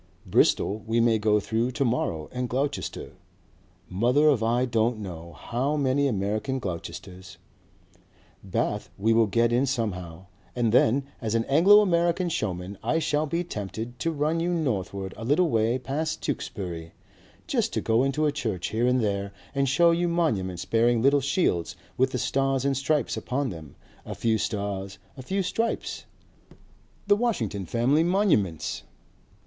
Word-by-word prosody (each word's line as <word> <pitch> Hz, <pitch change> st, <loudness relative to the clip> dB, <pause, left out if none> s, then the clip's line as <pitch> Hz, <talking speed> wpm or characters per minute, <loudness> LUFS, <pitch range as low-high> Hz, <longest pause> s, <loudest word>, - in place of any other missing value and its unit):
Bristol 105 Hz, -, +2 dB
we 115 Hz, +1 st, +1 dB
may 115 Hz, -1 st, +3 dB
go 105 Hz, 0 st, +3 dB
through 115 Hz, +4 st, -1 dB
to 135 Hz, -, 0 dB
morrow 85 Hz, -10 st, -1 dB
and 125 Hz, -1 st, -3 dB
Gloucester, 140 Hz, +3 st, -3 dB, 0.8 s
mother 125 Hz, +10 st, +3 dB
of 135 Hz, -6 st, +2 dB
I 120 Hz, +3 st, +2 dB
don't 115 Hz, -1 st, +1 dB
know 85 Hz, -5 st, -8 dB
how 130 Hz, -, -2 dB
many 140 Hz, 0 st, +2 dB
American 110 Hz, +4 st, -1 dB
Gloucesters. 95 Hz, -1 st, -7 dB, 1.1 s
Bath 100 Hz, +2 st, -2 dB
we'll 110 Hz, +2 st, +3 dB
get 115 Hz, +3 st, +2 dB
in 130 Hz, +3 st, +2 dB
somehow. 95 Hz, -9 st, -3 dB, 0.3 s
And 120 Hz, -3 st, +1 dB
then 125 Hz, +3 st, +4 dB, 0.2 s
as 110 Hz, -1 st, -1 dB
an 115 Hz, 0 st, +1 dB
Anglo 190 Hz, +9 st, +6 dB
American 175 Hz, -2 st, +1 dB
showman 95 Hz, -, -3 dB
I -, -, 0 dB
shall 155 Hz, -1 st, 0 dB
be 170 Hz, +4 st, -1 dB
tempted 115 Hz, -, -6 dB
to 165 Hz, -, 0 dB
run 155 Hz, +2 st, 0 dB
you 175 Hz, +2 st, 0 dB
northward 100 Hz, -, -2 dB
a 110 Hz, -, -7 dB
little 150 Hz, +7 st, +2 dB
way 115 Hz, +2 st, +2 dB
past 140 Hz, +5 st, -3 dB
Tewkesbury, 85 Hz, -4 st, -4 dB, 0.5 s
just -, -, 0 dB
to -, -, 0 dB
go 115 Hz, +1 st, +2 dB
into 140 Hz, +3 st, 0 dB
a 150 Hz, -, +2 dB
church 110 Hz, -11 st, -3 dB
here 115 Hz, +3 st, 0 dB
and 125 Hz, 0 st, +2 dB
there 100 Hz, -2 st, -1 dB, 0.2 s
and 140 Hz, -1 st, +1 dB
show 170 Hz, +5 st, +5 dB
you 175 Hz, +1 st, +1 dB
monuments 100 Hz, -, -1 dB
bearing 115 Hz, 0 st, +2 dB
little 140 Hz, +1 st, +4 dB
shields 135 Hz, -, 0 dB, 0.2 s
with 130 Hz, +1 st, +2 dB
the 130 Hz, -, -3 dB
stars 135 Hz, +1 st, 0 dB
and 140 Hz, -1 st, +2 dB
stripes 145 Hz, +2 st, 0 dB
upon 130 Hz, 0 st, -2 dB
them, 80 Hz, -5 st, -10 dB, 0.3 s
a -, -, -7 dB
few 110 Hz, -1 st, +1 dB
stars 100 Hz, -2 st, -3 dB, 0.2 s
and 130 Hz, -, -9 dB
a -, -, -23 dB
few 195 Hz, 0 st, 0 dB
stripes, 225 Hz, +6 st, -2 dB, 1.0 s
the 205 Hz, 0 st, +5 dB
Washington 115 Hz, -, -1 dB
family 130 Hz, -, +2 dB
monuments." 170 Hz, -, +1 dB
120 Hz, 155 wpm, -26 LUFS, 105-145 Hz, 1.1 s, Anglo